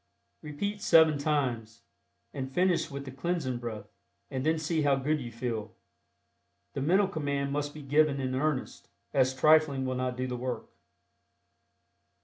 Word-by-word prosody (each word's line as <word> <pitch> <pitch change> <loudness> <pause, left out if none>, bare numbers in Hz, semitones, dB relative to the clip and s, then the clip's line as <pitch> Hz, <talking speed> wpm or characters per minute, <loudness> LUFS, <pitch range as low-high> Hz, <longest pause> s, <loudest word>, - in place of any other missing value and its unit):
Repeat 200 +8 -4
seven 160 -6 +5
times, 120 -6 -1 0.5
and 130 -1 -5
finish 175 0 +1
with 140 0 -6
the 130 - -7
Cleansing 135 -2 -2
Breath, 110 -4 -6 0.5
and 130 -1 -2
then 160 +2 +2
see 160 +1 -1
how 145 -2 +3
good 145 +3 0
you 120 -2 -6
feel. 115 -2 -4 1.0
The 135 - -3
mental 190 +7 +3
command 140 -5 -2
must 145 0 -2
be 150 0 -10
given 145 0 +3
"in 130 -1 -2
earnest," 140 0 -2 0.2
as 130 0 +3
trifling 150 -1 +4
will 130 - -1
not 125 0 -2
do 130 - -1
the 125 -1 -3
work. 125 0 -4
140 Hz, 150 wpm, -29 LUFS, 130-155 Hz, 1.0 s, seven